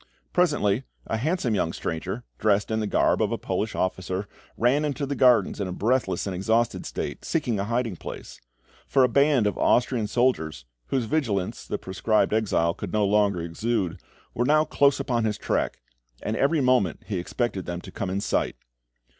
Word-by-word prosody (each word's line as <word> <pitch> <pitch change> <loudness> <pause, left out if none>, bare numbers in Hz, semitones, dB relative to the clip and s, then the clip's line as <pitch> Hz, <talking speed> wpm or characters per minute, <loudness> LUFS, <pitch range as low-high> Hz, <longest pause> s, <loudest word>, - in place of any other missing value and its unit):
Presently, 145 - +2 0.2
a 110 - -2
handsome 140 -1 0
young 90 -5 +1
stranger, 95 +8 -4 0.2
dressed 105 0 +2
in 110 - +1
the 105 - -1
garb - - +2
of - - +1
a - - 0
Polish 105 +1 -2
officer, 95 +1 -2 0.3
ran 130 +6 +3
into 145 -1 -1
the 140 - -2
gardens 125 -5 +4
in 95 - -1
a - - -4
breathless 120 +7 0
and 95 -2 -3
exhausted 110 +5 0
state, - - -5
seeking 125 -10 -1
a 100 - -1
hiding 115 -2 -1
place; - - -9 0.5
for 135 - +4
a - - +6
band 140 -2 +3
of 105 -3 -1
Austrian 120 -3 +2
soldiers, 80 - 0 0.2
whose 125 - 0
vigilance 110 -9 -1
the - - -2
proscribed 105 +3 0
exile 95 -6 +2
could - - -6
no 105 -1 +3
longer 100 -3 +2
elude, 95 +2 -2 0.3
were 120 - 0
now 155 +4 +4
close 140 -2 +3
upon 120 -3 0
his 105 -2 0
track, - - -2 0.4
and 110 - -1
every 145 +5 +2
moment 125 -9 +2
he 100 -5 -2
expected 95 +1 -2
them 85 0 -3
to - - -11
come 95 - -4
in 95 +2 -1
sight. - - 0
110 Hz, 180 wpm, -25 LUFS, 95-125 Hz, 0.5 s, a